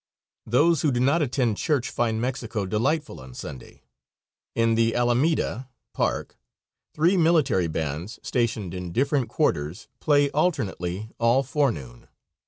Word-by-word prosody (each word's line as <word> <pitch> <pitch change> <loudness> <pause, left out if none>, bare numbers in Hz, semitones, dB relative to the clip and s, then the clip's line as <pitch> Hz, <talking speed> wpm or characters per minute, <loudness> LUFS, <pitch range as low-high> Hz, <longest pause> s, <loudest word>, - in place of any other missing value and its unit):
Those 150 +8 +3
who 150 - +2
do 120 - 0
not 140 +7 +3
attend 125 -6 0
church 145 -7 0
find 115 -2 0
Mexico 120 -4 -2
delightful 130 +11 -1
on 65 -1 -12
Sunday. 65 - -9 0.7
In 115 0 +3
the 115 0 +2
alameda 125 +1 +1 0.2
(park) - - -2 0.6
three 170 +5 +3
military 155 - +3
bands, 80 +5 -4
stationed 115 -6 -1
in 90 -2 -6
different 135 -1 +1
quarters, 75 -1 -1
play 145 -2 +3
alternately 110 - -1
all 120 +3 +3
forenoon. 115 - -2
120 Hz, 125 wpm, -25 LUFS, 100-145 Hz, 0.7 s, Those